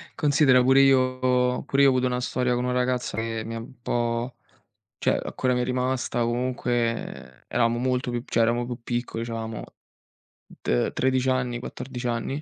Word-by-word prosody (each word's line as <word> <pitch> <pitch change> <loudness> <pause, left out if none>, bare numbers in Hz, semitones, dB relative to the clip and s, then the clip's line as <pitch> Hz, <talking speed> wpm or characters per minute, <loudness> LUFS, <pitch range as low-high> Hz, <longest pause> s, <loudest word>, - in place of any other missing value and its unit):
considera 140 -4 +4
pure 130 +2 +6
io 130 -1 +3
pure 140 0 +2
io - - +7
ho - - +4
avuto 130 0 +1
una 125 0 -1
storia 125 0 0
con 125 - -1
una 125 - 0
ragazza 125 -2 -1
che 115 0 -2
mi 115 - -5
è - - -3
un 120 +2 -10
po' 120 +1 -1 0.6
cioè - - +2
ancora 130 -1 -1
mi 125 - 0
è - - 0
rimasta 125 -1 -1
comunque, 120 -1 0
ehm, 115 - -8
eravamo 120 -1 +1
molto 125 +1 0
più 120 -1 -3
cioè - - 0
eravamo 120 +1 +2
più 120 0 -5
piccoli, 120 -1 -3
c'avevamo 115 -1 -5 1.0
t - - +1
13 130 0 +1
anni, 125 -2 0
14 125 0 -7
anni, 120 +5 -2
125 Hz, 180 wpm, -25 LUFS, 120-130 Hz, 1.0 s, io